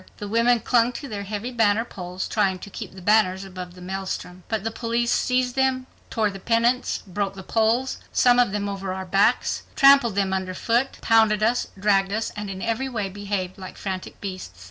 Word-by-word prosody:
The 205 - -6
women 230 +2 +3
clung 240 0 +3
to 280 - -6
their 210 -5 -5
heavy 210 +4 -4
banner 225 -1 +2
poles, 180 -3 -6
trying 195 -4 +1
to 200 - -13
keep - - -8
the 185 - -11
banners 195 -2 +3
above 180 -2 -8
the 180 - -13
maelstrom. 185 -1 -5
But 220 -3 -1
the 225 - -2
police 235 +1 -1
seized 250 -1 +1
them, 265 -1 +1 0.2
tore 215 -3 0
the 195 - -8
pennants, 235 +4 +1
broke 195 +1 -3
the 190 - -8
poles, 230 +6 +1
some 245 -1 +4
of 245 -5 +3
them 205 0 -2
over 195 -1 -4
our 190 0 -5
backs, 195 +2 +2
trampled 275 -6 +6
them 195 -1 +1
underfoot, 190 +7 -1
pounded 220 -2 +4
us, 235 +3 +2
dragged 195 -1 +2
us, 220 +2 -2
and 210 -1 -5
in 190 -1 -6
every 230 +4 -1
way 215 -6 -3
behaved 195 -1 -4
like 185 -1 -9
frantic 190 -2 -5
beasts. 185 - -7
210 Hz, 195 wpm, -24 LUFS, 190-235 Hz, 0.2 s, trampled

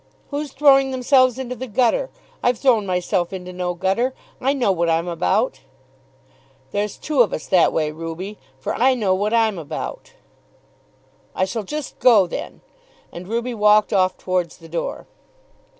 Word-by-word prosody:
"Who's 290 0 -3
throwing 270 -1 +5
themselves 255 -1 +3
into 255 -1 -4
the 260 +2 -6
gutter? 260 - +1 0.3
I've 245 -1 +2
thrown 230 -7 +2
myself 180 -1 0
into 180 -1 -7
no 180 -1 -3
gutter. 195 +9 0 0.3
I 270 - +2
know 255 -8 +1
what 170 -2 0
I'm 165 +1 +1
about." 165 -5 0 1.1
"There's 205 0 -2
two 300 -4 +1
of 230 - +3
us - - -4
that 180 -3 +4
way, 155 -1 0
Ruby; 165 +6 -7 0.2
for 130 - -3
I 260 +2 +3
know 205 -6 +1
what 205 +3 0
I'm 225 -5 +2
about." 325 - -6 1.2
"I 185 - +1
shall 225 +4 -3
just 295 +7 -6
go 220 -7 +6
then." 175 - -7 0.5
And 175 +1 -9
Ruby 235 +3 -2
walked 210 -1 +4
off 185 -1 +2
towards 180 -3 -2
the 165 - -14
door. 165 +1 -4
210 Hz, 160 wpm, -21 LUFS, 180-255 Hz, 1.2 s, go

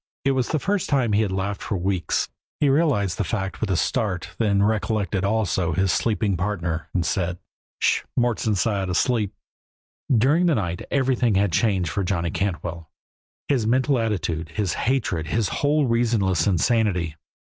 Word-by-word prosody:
It 135 - +4
was 130 -2 0
the 155 - 0
first 195 +5 -1
time 130 -7 +2
he 105 - +4
had 105 -3 0
laughed 95 +1 -2
for 100 - -2
weeks. 90 0 0 0.3
He 145 - +3
realized 135 - +2
the - - +2
fact 95 +1 -3
with 110 - -1
a 95 - +1
start, 90 -5 -1
then 100 -3 +2
recollected 105 -3 0
also 95 -5 0
his 95 +3 +2
sleeping 105 -3 +1
partner, 85 -3 -2
and 90 -3 0
said: 85 +2 -1 0.4
"Sh - - +2
h! - - -17
Mort's 120 -2 +1
inside, 100 -2 0
asleep!" 105 +2 +1 0.8
During 140 +9 +4
the 165 - +3
night 90 -5 -2
everything 130 -5 +1
had 100 -1 +2
changed 95 -3 +1
for 100 - -1
Johnny 85 -3 -1
Cantwell; 85 -3 -3 0.6
his 125 -7 +1
mental 130 +2 +2
attitude, 95 -7 -2
his 100 -6 -1
hatred, 105 -11 -1
his 110 +4 0
whole 145 0 +1
reasonless 115 -8 +1
insanity. 95 -4 +1
100 Hz, 165 wpm, -23 LUFS, 90-120 Hz, 0.8 s, It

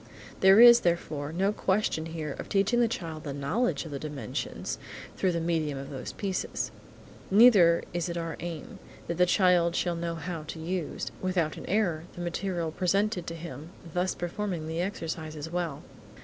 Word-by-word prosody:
There 190 +2 +7
is, 240 0 +10
therefore, 155 -5 -1
no 190 +5 +1
question 190 -6 0
here 160 -3 -4
of - - -6
teaching 200 +4 +2
the 240 - +4
child 165 -8 -5
the 145 - -4
knowledge 175 - 0
of 160 - -8
the 140 - -4
dimensions, 145 -7 -4 0.4
through 185 - +1
the 170 - -1
medium 160 -4 -1
of 135 0 -7
these 130 -3 -5
pieces. 195 -3 -3 0.6
Neither 195 -6 +7
is 175 0 -1
it 170 - -3
our 165 -1 -3
aim 170 -3 -6 0.3
that 170 - -3
the 180 0 +4
child 175 -2 +4
shall 175 -1 0
know 170 0 -3
how 165 0 -5
to 155 +2 -8
use, 175 0 -3
without 180 -4 0
an - - -9
error, 175 -5 +1
the 175 - -6
material 175 -1 -2
presented 190 +1 0
to 165 - -4
him 160 -2 -8 0.2
thus 180 +1 0
performing 175 -1 -3
the 160 +2 -2
exercises 160 -4 -4
well. 170 -5 -3
170 Hz, 175 wpm, -28 LUFS, 160-185 Hz, 0.6 s, is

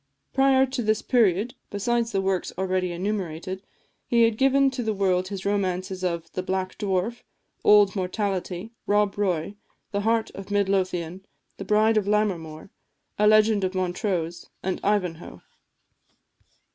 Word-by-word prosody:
Prior 270 0 +4
to 260 -1 -3
this 215 -1 0
period, 225 -1 +2 0.2
besides 235 +3 0
the 195 - 0
works 190 -1 -1
already 185 -1 0
enumerated, 185 -1 -3 0.5
he 235 -1 +4
had 230 -1 +3
given 270 +2 +3
to 255 -1 -4
the 220 -2 -1
world 185 -2 +1
his 195 -1 -6
romances 185 -2 -1
of 170 -2 -2
"The 185 - -3
Black 185 0 -2
Dwarf," 200 +4 -1 0.4
"Old 205 -1 +6
Mortality," 190 0 -2 0.2
"Rob 205 -1 +2
Roy," 195 -1 -1 0.3
"The 200 - -1
Heart 225 +1 +1
of 195 0 -9
Midlothian," 190 -3 0 0.3
"The - - -6
Bride 215 +1 +3
of 205 -2 +1
Lammermoor," 190 -6 -1 0.5
"A 210 - +5
Legend 215 -1 +5
of 185 0 -1
Montrose," 180 -2 -2
and 190 -1 -2
"Ivanhoe." 185 -5 -2
195 Hz, 140 wpm, -25 LUFS, 185-215 Hz, 0.5 s, Old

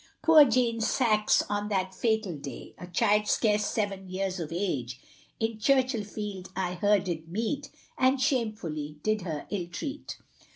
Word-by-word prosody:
Poor 315 -2 +8
Jane 235 -2 +1
Sax, 215 -2 +3
on 205 0 -2
that 190 -2 -1
fatal 220 -2 0
day, 140 -1 -8
A 180 - -8
child 210 +4 +2
scarce 210 -2 +2
seven 195 -3 -2
years 190 0 -2
of 165 -2 -5
age; 140 -9 -2 0.4
In 225 -1 -1
Churchill 255 -1 +2
field 205 -3 -6
I 180 -1 -1
her 205 +3 +3
did 170 -4 -4
meet, 235 - -2 0.3
And 260 +1 +4
shamefully 215 - -1
did 215 -1 +1
her 160 -5 -4
illtreat. 205 - -5
205 Hz, 150 wpm, -28 LUFS, 180-230 Hz, 0.4 s, Poor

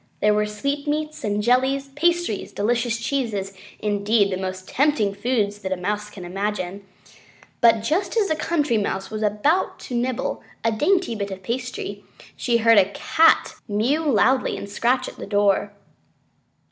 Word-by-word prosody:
There 210 0 +3
were 210 0 +1
sweetmeats 290 +7 -3
and 210 0 -1
jellies, 265 +3 +2
pastries, 340 - 0
delicious 235 +2 0
cheeses, 230 -6 -2 0.2
indeed, 205 0 +1
the - - 0
most 185 0 -5
tempting 260 -8 +1
foods 205 -1 -1
that 190 -2 -5
a 185 - 0
Mouse 210 +3 -3
can 195 -4 -10
imagine. 195 +1 -3 0.8
But 230 -2 +5
just 330 - 0
as 420 -3 +3
the 315 - +1
Country 295 -8 0
Mouse 195 -1 -3
was 215 0 -4
about 215 - +1
to - - -8
nibble 245 0 -1 0.2
a 230 - +2
dainty 330 - +1
bit 200 -2 -3
of 190 -1 -8
pastry, 255 - -4 0.3
she 240 -2 +1
heard 230 -1 +6
a 190 0 +3
Cat 315 +2 +3
mew 225 +8 +1
loudly 260 -1 +2
and - - -6
scratch 245 +5 0
at - - -9
the - - -7
door. 205 0 +2
225 Hz, 160 wpm, -23 LUFS, 205-275 Hz, 0.8 s, heard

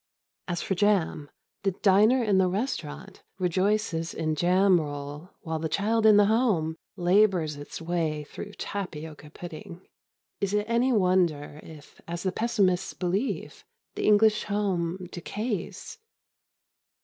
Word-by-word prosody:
As 175 -1 -2
for - - -1
jam, 190 -7 +1 0.3
the 195 -1 0
diner 215 +6 +5
in 200 -4 +3
the 185 - +4
restaurant 185 - -4 0.2
rejoices 185 -2 0
in 155 -1 -1
jam 180 +3 +4
roll 145 +2 -7
while 160 -2 -3
the 160 0 -2
child 220 +6 +2
in 210 -1 +7
the 205 - +6
home 205 -8 +1 0.2
labours 180 -4 +3
its 145 0 -8
way 165 -3 -2
through 205 +7 -9
tapioca 160 -8 -6
pudding. 170 +2 -10 0.5
Is 200 0 -1
it 210 0 +1
any 235 +3 +2
wonder 180 -8 +1
if, 155 -2 -14
as 170 0 -5
the 190 - 0
pessimists 195 -4 0
believe, 190 +8 -2 0.3
the - - -2
English 215 0 +4
home 185 -3 -1
decays? 205 - -5
185 Hz, 130 wpm, -27 LUFS, 160-205 Hz, 0.5 s, in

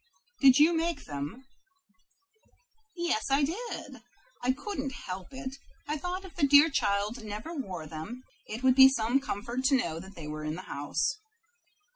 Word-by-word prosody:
"Did 265 -1 +7
you 315 +3 +6
make 325 -2 -1
them?" 145 - -6 1.5
"Yes, 345 -11 0
I 275 +2 +3
did. 330 - -4 0.4
I 250 - +2
couldn't 280 -1 -4
help 185 -4 -6
it. 260 0 -7 0.3
I 300 - -1
thought 360 +5 -4
if 375 - -12
the 290 -5 +3
dear 290 +3 +7
child 210 0 0
never 215 +10 -6
wore 190 - -5
them, 160 +12 -7 0.2
it 225 +4 -6
would 260 -1 +6
be 265 +1 +9
some 245 0 +1
comfort 245 -1 -4
to 275 +1 +5
know 165 -9 -2
they 190 -3 -10
were 155 0 -5
in 155 +1 -2
the 185 - -7
house." 145 - -2
260 Hz, 160 wpm, -29 LUFS, 200-290 Hz, 1.5 s, be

